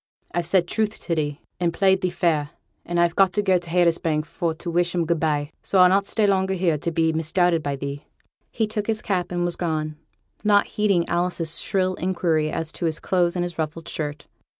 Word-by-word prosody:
I've 175 Hz, -1 st, -1 dB
said 175 Hz, -1 st, +3 dB
truth 215 Hz, +2 st, -1 dB
to 170 Hz, -, -2 dB
thee, 145 Hz, -3 st, -2 dB, 0.2 s
and 175 Hz, -1 st, +1 dB
played 190 Hz, +2 st, +3 dB
thee 185 Hz, -, +1 dB
fair, 165 Hz, -5 st, 0 dB, 0.4 s
and 175 Hz, 0 st, 0 dB
I've 170 Hz, -1 st, +2 dB
got 190 Hz, -1 st, +4 dB
to 205 Hz, -, +1 dB
go 190 Hz, -2 st, +3 dB
to 170 Hz, -1 st, -9 dB
Haytersbank 165 Hz, -3 st, +2 dB
for 165 Hz, -1 st, -2 dB
to 170 Hz, +1 st, -6 dB
wish 175 Hz, +1 st, +1 dB
'em 170 Hz, -2 st, +1 dB
good 170 Hz, 0 st, 0 dB
by, 150 Hz, -2 st, 0 dB
so 195 Hz, -, -1 dB
I'll 180 Hz, -1 st, +7 dB
not 195 Hz, +1 st, +2 dB
stay 220 Hz, -, +1 dB
longer 190 Hz, -1 st, +2 dB
here 170 Hz, -4 st, +1 dB
to 170 Hz, -, -2 dB
be 160 Hz, 0 st, +1 dB
misdoubted 165 Hz, +1 st, +2 dB
by 145 Hz, -2 st, -2 dB
thee.' 140 Hz, +1 st, -6 dB, 0.4 s
He 225 Hz, -, 0 dB
took 215 Hz, -1 st, -3 dB
his 220 Hz, -1 st, -1 dB
cap 185 Hz, -4 st, -1 dB
and 175 Hz, 0 st, 0 dB
was 175 Hz, -, -1 dB
gone, 155 Hz, -3 st, -2 dB, 0.5 s
not 205 Hz, -1 st, +4 dB
heeding 200 Hz, -5 st, +1 dB
Alice's 175 Hz, -2 st, -1 dB
shrill 185 Hz, -1 st, 0 dB
inquiry 170 Hz, -4 st, 0 dB
as 160 Hz, +1 st, -3 dB
to -, -, -4 dB
his 160 Hz, -1 st, 0 dB
clothes 175 Hz, -2 st, +1 dB
and 175 Hz, -1 st, 0 dB
his 175 Hz, -2 st, -7 dB
ruffled 160 Hz, +1 st, -3 dB
shirt. 150 Hz, -1 st, -4 dB
175 Hz, 220 wpm, -23 LUFS, 160-185 Hz, 0.5 s, I'll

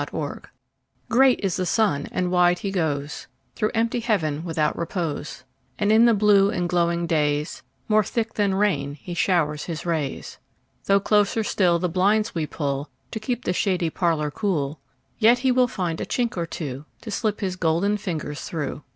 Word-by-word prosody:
Summer -, -, -4 dB
Sun -, -, -19 dB, 0.6 s
GREAT 260 Hz, +1 st, +5 dB
is 190 Hz, -3 st, 0 dB
the 185 Hz, -, -1 dB
sun, 170 Hz, -9 st, +1 dB
and 180 Hz, -1 st, -1 dB
wide 180 Hz, 0 st, +4 dB
he 195 Hz, -, -4 dB
goesThrough 160 Hz, +5 st, -3 dB
empty 230 Hz, +2 st, +1 dB
heaven 165 Hz, -10 st, 0 dB
without 160 Hz, -3 st, 0 dB
repose; 165 Hz, -4 st, -4 dB, 0.3 s
And 210 Hz, 0 st, +1 dB
in 225 Hz, +2 st, +6 dB
the 235 Hz, -2 st, +5 dB
blue 200 Hz, -1 st, +5 dB
and 180 Hz, -5 st, -1 dB
glowing 170 Hz, -1 st, +1 dB
daysMore 155 Hz, +7 st, 0 dB
thick 225 Hz, +2 st, -2 dB
than 200 Hz, -2 st, +1 dB
rain 145 Hz, -9 st, 0 dB
he 175 Hz, +4 st, -8 dB
showers 160 Hz, -4 st, +1 dB
his 165 Hz, -1 st, -5 dB
rays. 155 Hz, -5 st, -3 dB, 0.5 s
Though 200 Hz, 0 st, +4 dB
closer 210 Hz, +2 st, +2 dB
still 180 Hz, -4 st, +2 dB
the 180 Hz, +2 st, -1 dB
blinds 200 Hz, +5 st, +2 dB
we 160 Hz, -3 st, -2 dB
pullTo 140 Hz, -1 st, -3 dB, 0.3 s
keep 245 Hz, +2 st, -3 dB
the 180 Hz, -, +1 dB
shady 180 Hz, -3 st, 0 dB
parlour 160 Hz, -4 st, 0 dB
cool, 155 Hz, -7 st, -2 dB, 0.4 s
Yet 235 Hz, +2 st, +6 dB
he 255 Hz, +1 st, +1 dB
will 250 Hz, 0 st, +4 dB
find 175 Hz, -7 st, -3 dB
a -, -, -2 dB
chink 240 Hz, -1 st, -1 dB
or 170 Hz, -2 st, -2 dB
twoTo 145 Hz, -4 st, -6 dB, 0.2 s
slip 215 Hz, 0 st, -1 dB
his 185 Hz, -2 st, -1 dB
golden 180 Hz, +4 st, +1 dB
fingers 155 Hz, -7 st, -4 dB
through. 150 Hz, -3 st, -4 dB
180 Hz, 170 wpm, -24 LUFS, 155-210 Hz, 0.6 s, in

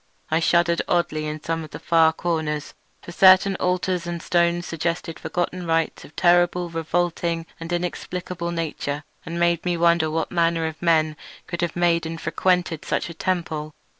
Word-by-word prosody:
I 160 Hz, -, +3 dB
shuddered 170 Hz, 0 st, +3 dB
oddly 155 Hz, -3 st, 0 dB
in 150 Hz, 0 st, -5 dB
some 165 Hz, 0 st, -2 dB
of 155 Hz, -, -9 dB
the -, -, -7 dB
far 165 Hz, -1 st, +4 dB
corners; 160 Hz, -2 st, -2 dB, 0.3 s
for -, -, -9 dB
certain 190 Hz, +2 st, +6 dB
altars 180 Hz, -1 st, 0 dB
and 170 Hz, 0 st, -3 dB
stones 170 Hz, +1 st, +1 dB
suggested 165 Hz, 0 st, -3 dB
forgotten 175 Hz, 0 st, -3 dB
rites 165 Hz, 0 st, 0 dB
of 150 Hz, -, -15 dB
terrible, 175 Hz, 0 st, +3 dB
revolting, 165 Hz, 0 st, -1 dB
and 165 Hz, +1 st, -7 dB
inexplicable 175 Hz, 0 st, -3 dB
nature, 150 Hz, -3 st, -3 dB, 0.2 s
and 170 Hz, +1 st, -4 dB
made 170 Hz, -1 st, +2 dB
me 175 Hz, -1 st, 0 dB
wonder 170 Hz, -1 st, +3 dB
what 160 Hz, 0 st, -2 dB
manner 170 Hz, -1 st, +1 dB
of 160 Hz, 0 st, -5 dB
men 155 Hz, -3 st, +2 dB, 0.3 s
could 170 Hz, -, -4 dB
have 175 Hz, -2 st, -1 dB
made 170 Hz, -2 st, +2 dB
and 165 Hz, 0 st, -5 dB
frequented 175 Hz, 0 st, 0 dB
such -, -, -2 dB
a -, -, -8 dB
temple. 160 Hz, -4 st, -2 dB
170 Hz, 165 wpm, -23 LUFS, 160-175 Hz, 0.3 s, certain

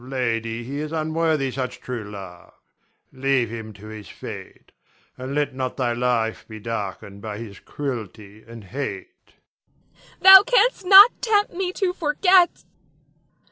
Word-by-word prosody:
Lady, 115 Hz, -3 st, -3 dB
he 140 Hz, +4 st, -6 dB
is 155 Hz, 0 st, -5 dB
unworthy 155 Hz, -3 st, -1 dB
such 125 Hz, 0 st, -5 dB
true 125 Hz, -3 st, -6 dB
love; 95 Hz, -4 st, -11 dB, 0.6 s
leave 130 Hz, -3 st, 0 dB
him 110 Hz, -1 st, -7 dB
to 105 Hz, 0 st, -15 dB
his 110 Hz, -1 st, -10 dB
fate, -, -, -11 dB, 0.4 s
and 130 Hz, +2 st, -6 dB
let 145 Hz, -2 st, -1 dB
not 130 Hz, -1 st, -4 dB
thy 125 Hz, -3 st, 0 dB
life 120 Hz, -2 st, -1 dB
be 110 Hz, -1 st, -10 dB
darkened 100 Hz, -2 st, -6 dB
by 105 Hz, -1 st, -6 dB
his 105 Hz, -3 st, -10 dB
cruelty 110 Hz, -6 st, -7 dB
and 115 Hz, -1 st, -11 dB
hate. 375 Hz, -, -8 dB, 0.6 s
Nina. -, -, -27 dB, 0.2 s
Thou 385 Hz, 0 st, +11 dB
canst -, -, +2 dB
not 400 Hz, +5 st, +10 dB
tempt 420 Hz, -3 st, +1 dB
me 365 Hz, 0 st, -3 dB
to 370 Hz, -2 st, -1 dB
forget. 360 Hz, +2 st, +2 dB
125 Hz, 140 wpm, -22 LUFS, 110-165 Hz, 0.6 s, Thou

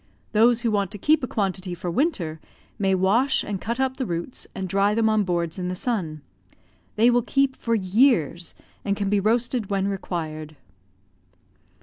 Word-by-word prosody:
Those 230 Hz, +2 st, +4 dB
who 235 Hz, -2 st, 0 dB
want 200 Hz, -3 st, +1 dB
to -, -, -5 dB
keep 305 Hz, +9 st, +3 dB
a -, -, 0 dB
quantity 190 Hz, -4 st, -2 dB
for 175 Hz, 0 st, -4 dB
winter 175 Hz, -, -1 dB
use -, -, -29 dB, 0.3 s
may 195 Hz, -1 st, +2 dB
wash 215 Hz, +9 st, +2 dB
and 200 Hz, -3 st, -4 dB
cut 235 Hz, +3 st, -3 dB
up 265 Hz, 0 st, 0 dB
the 260 Hz, -, -2 dB
roots, 170 Hz, +8 st, -4 dB
and 190 Hz, -1 st, -3 dB
dry 200 Hz, +3 st, +2 dB
them 225 Hz, -1 st, +2 dB
on 215 Hz, -1 st, +3 dB
boards 175 Hz, -1 st, -1 dB
in 180 Hz, -, -2 dB
the 180 Hz, -, -2 dB
sun. 175 Hz, -, -2 dB, 0.7 s
They 235 Hz, +3 st, +5 dB
will 245 Hz, 0 st, +3 dB
keep 275 Hz, +2 st, +1 dB
for 230 Hz, -1 st, -1 dB
years, 185 Hz, -, +2 dB, 0.3 s
and 200 Hz, 0 st, -1 dB
can 200 Hz, -1 st, -1 dB
be 205 Hz, -, +3 dB
roasted 230 Hz, +1 st, 0 dB
when 195 Hz, -1 st, 0 dB
required. 155 Hz, -5 st, -4 dB
200 Hz, 185 wpm, -24 LUFS, 180-235 Hz, 0.7 s, They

